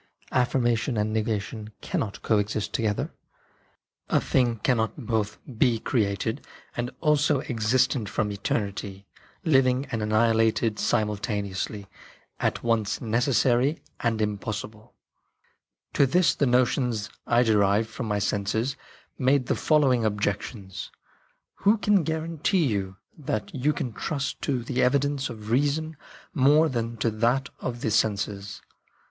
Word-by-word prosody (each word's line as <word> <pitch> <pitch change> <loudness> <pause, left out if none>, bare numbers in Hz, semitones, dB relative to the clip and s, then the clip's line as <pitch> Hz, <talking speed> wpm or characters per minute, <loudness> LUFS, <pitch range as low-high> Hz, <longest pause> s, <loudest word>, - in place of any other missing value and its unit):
Affirmation 120 -1 +1
and 105 +1 0
negation 110 0 -2
can - - -2
not 100 -3 -4
coexist 105 -1 0
together. 105 -3 -1 1.0
A - - +3
thing 120 -3 +1
cannot 115 +1 0
both 110 -2 -1 0.2
be 120 -3 +4
created 110 -1 -1 0.3
and 120 0 -2
also 150 -3 +3
existent 125 -3 +1
from 105 -1 -1
eternity, 100 -1 -3 0.4
living 130 -3 +3
and 115 -3 -2
annihilated 110 0 +2
simultaneously, 105 -1 -1 0.5
at - - -1
once 115 -3 0
necessary 120 +3 +2
PHENOMENA - - -26
OF - - -34
DREAMS 120 - +2
17 - - -1
and 110 -1 -3 0.2
impossible.' 110 +1 -6 0.5
" - - -45
To 140 - +4
this 180 +6 +3
the 140 - +1
notions 125 -3 +1 0.2
I 120 +1 +4
derived 105 -1 +3
from 110 +1 -6
my 105 -1 0
senses 105 +5 -1 0.4
made 130 0 +3
the - - 0
following 135 -6 +3
objections: 100 -2 -3 0.4
" - - -43
Who 205 +3 +3
can 205 -2 +3
guarantee 160 +2 0
you 100 -6 -2 0.2
that 185 +7 -3
you 140 +1 +1
can 130 -5 -4
trust 140 +3 -3
to 130 -4 -1
the 125 +1 -1
evidence 140 +1 +1
of 110 -1 -8
reason 145 +5 +1 0.4
more 150 +4 +5
than 115 -2 -3
to 115 +2 0
that 120 +5 +1
of 120 -1 -4
the 110 - 0
senses 100 -1 -1
115 Hz, 135 wpm, -26 LUFS, 105-135 Hz, 1.0 s, more